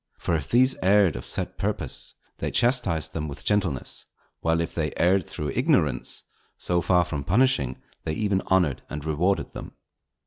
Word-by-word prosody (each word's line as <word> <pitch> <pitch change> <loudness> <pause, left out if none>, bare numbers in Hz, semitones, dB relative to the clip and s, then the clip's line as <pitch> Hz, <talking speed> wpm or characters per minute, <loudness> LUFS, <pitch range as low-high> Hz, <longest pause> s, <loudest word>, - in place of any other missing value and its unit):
For 85 - -2
if 75 -4 -1
these 130 +2 +4
erred 95 -3 +4
of - - -7
set - - -4
purpose, - - -3 0.2
they - - -1
chastised 120 - +1
them 75 -1 -3
with 70 0 -7
gentleness; 95 -11 0 0.4
while 80 0 +1
if 85 0 -2
they 75 -3 -1
erred 90 +1 +3
through 75 -2 -4
ignorance, - - +1 0.3
so 90 -1 +1
far 90 0 +3
from 75 -5 -4
punishing, 90 - +2 0.2
they 80 - -2
even 100 +1 0
honoured 90 -8 +2
and 75 0 -6
rewarded 85 +6 0
them. - - -8
85 Hz, 165 wpm, -25 LUFS, 75-100 Hz, 0.4 s, these